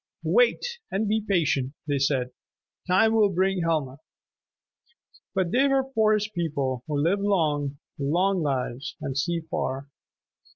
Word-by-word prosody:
"Wait 485 0 +2
and 205 +3 -1
be 220 +1 +1
patient," 155 -10 0
they 145 -1 0
said. 130 -2 +1 0.6
"Time 190 +5 +4
will 215 -2 +4
bring 190 0 +1
Helma." 150 -5 -1 1.4
But 185 -3 +1
they 265 +3 +4
were 270 -1 +1
Forest 215 -2 +2
People, 140 -7 -2
who 150 -2 -1
live 170 +8 +2
long, 150 -8 0 0.2
long 180 +7 +1
lives, 135 -1 -2
and 140 -4 -4
see 170 +4 0
far. 140 -3 -4
170 Hz, 130 wpm, -26 LUFS, 140-205 Hz, 1.4 s, Time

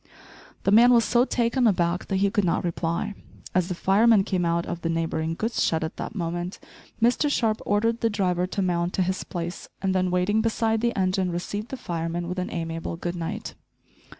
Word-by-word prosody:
The 195 - +2
man 235 +4 +7
was 235 -2 +5
so 240 +1 +3
taken 240 0 +1
aback 175 -3 +1
that 195 - -1
he 195 +1 +2
could 205 -2 +1
not 170 - +1
reply. 170 +2 -2 0.4
As 185 -1 +2
the 180 - -3
fireman 205 +3 +4
came 185 -3 -1
out 170 0 +1
of 175 -1 -5
the 165 - -1
neighbouring 165 0 -1
goods 225 +5 -1
shed 160 -1 +1
at 160 - -5
that - - -5
moment, 175 0 -3 0.4
Mr 245 +6 +3
Sharp 225 -6 +1
ordered 230 +3 +1
the 230 - +2
driver 180 -4 0
to 195 +1 -2
mount 175 -1 0
to 190 - +1
his 185 +1 -2
place, 175 0 -6
and 190 -1 0
then 185 -1 +1
waiting 180 +4 +2
beside 225 0 +1
the 235 -1 0
engine 185 0 +1
received 205 +6 -4
the 265 - -5
fireman 170 -3 -3
with 180 +1 -3
an 180 - -3
amiable 165 0 -4
"Good 175 +1 -4
night." 165 -2 -5
185 Hz, 205 wpm, -25 LUFS, 170-220 Hz, 0.4 s, man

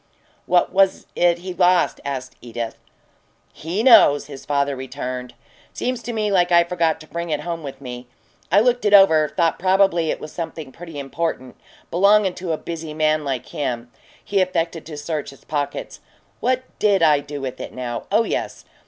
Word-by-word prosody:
"What 175 0 +2
was 195 0 +3
it 175 -1 +3
he 185 +1 -6
lost?" 180 -1 +2
asked 135 -2 -5
Edith. 115 -1 -5 0.8
"He 175 +8 -3
knows!" 145 - +7
her 140 -1 -9
father 140 0 -1
returned. 130 -1 -6 0.4
"Seems 250 -1 -2
to 240 - -5
me 215 -2 -1
like 180 -2 +3
I 170 0 +6
forgot 170 -2 0
to 155 - -13
bring 170 +1 -5
it 150 -1 -1
home 170 +1 -4
with 135 -3 -8
me. 125 -2 -8 0.4
I 200 +4 +6
looked 245 0 +2
it 205 -1 +5
over 160 -6 +6
thought 165 +1 0
probably 185 -3 +3
it - - -1
was 155 - -8
something 160 -4 -6
pretty 165 0 -10
important, 140 -2 -4 0.4
belongin' 200 +1 +4
to 175 -2 -4
a 160 - 0
busy 160 -2 -6
man 155 0 +2
like 135 -4 -3
him." 120 -4 -4 0.3
He 200 -1 +1
affected 165 -3 -1
to 155 -2 -7
search 150 0 -4
his 135 - -15
pockets. 145 -2 -4 0.4
"What 255 0 0 0.2
DID 200 -4 +3
I 150 -3 +5
do 145 0 -7
with 130 -2 -5
it, - - -6
now? 120 -2 -5
Oh 215 +3 +4
yes! - - -4
165 Hz, 180 wpm, -21 LUFS, 140-185 Hz, 0.8 s, knows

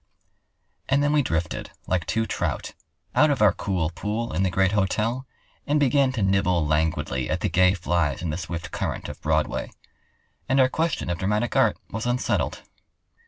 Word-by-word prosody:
And 140 +1 +3
then 145 +1 +2
we 150 - +4
drifted, 80 - -2 0.2
like 90 -3 -1
two 110 0 0
trout, - - -3 0.4
out 155 - +5
of 140 - +1
our 105 -3 +5
cool 90 -6 -1
pool 105 +6 -3
in - - 0
the 95 - +2
great 95 +2 +2
hotel 110 +6 0 0.4
and 150 +1 +2
began 140 -1 +3
to 115 -5 -1
nibble 95 -4 +2
languidly 75 -4 0
at - - -1
the - - 0
gay 90 +1 +4
flies 85 -4 0
in 85 - -1
the 75 - -3
swift 85 0 -5
current - - -3
of - - -9
Broadway. - - 0 0.8
And 135 +1 +3
our 130 -1 +5
question 160 - -1
of 85 - -3
dramatic 105 +5 0
art - - +3
was 110 +2 -3
unsettled. 120 +1 -1
95 Hz, 175 wpm, -25 LUFS, 85-125 Hz, 0.8 s, out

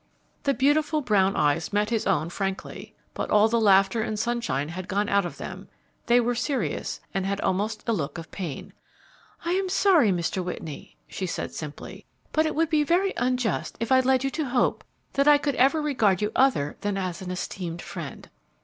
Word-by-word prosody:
The 275 -1 +2
beautiful 300 +3 +2
brown 195 -6 +2
eyes 145 -1 +1
met 210 +2 +1
his 225 -2 0
own 170 -4 +1
frankly, 195 0 -5 0.2
but - - -4
all 210 +1 +5
the 230 0 +1
laughter 195 +1 +4
and 215 -1 -2
sunshine 220 - -1
had 180 +2 -6
gone 205 +2 0
out 200 -3 +2
of 145 - -10
them. - - -8 0.4
They 240 +1 +5
were 245 0 +1
serious 265 +3 -2
and 195 - -1
had 195 +1 -1
almost 210 +4 -1
a 230 - +2
look 160 -5 -3
of 165 -1 -9
pain. 170 -8 -6 0.7
"I 340 - 0
am 380 +1 0
sorry, 360 - +4
Mr. 180 +1 -1
Whitney," 160 -4 -7
she 190 - -4
said, - - -4
simply; 150 -2 -8 0.2
"but 315 0 +2
it - - -3
would 325 +1 +1
be 305 -1 +3
very 360 +5 +2
unjust 250 -1 -1
if 230 +2 -3
I 260 - +7
led 260 0 +2
you 270 - 0
to 310 +1 -2
hope 245 -1 +1 0.3
that 275 +1 +2
I 295 -1 +8
could 290 0 -1
ever 275 +5 +4
regard 240 - +2
you 210 +1 -1
other 250 - +2
than 205 -1 -1
as 185 -2 -3
an 185 - -6
esteemed 180 -1 -5
friend." - - -7
215 Hz, 195 wpm, -26 LUFS, 190-270 Hz, 0.7 s, I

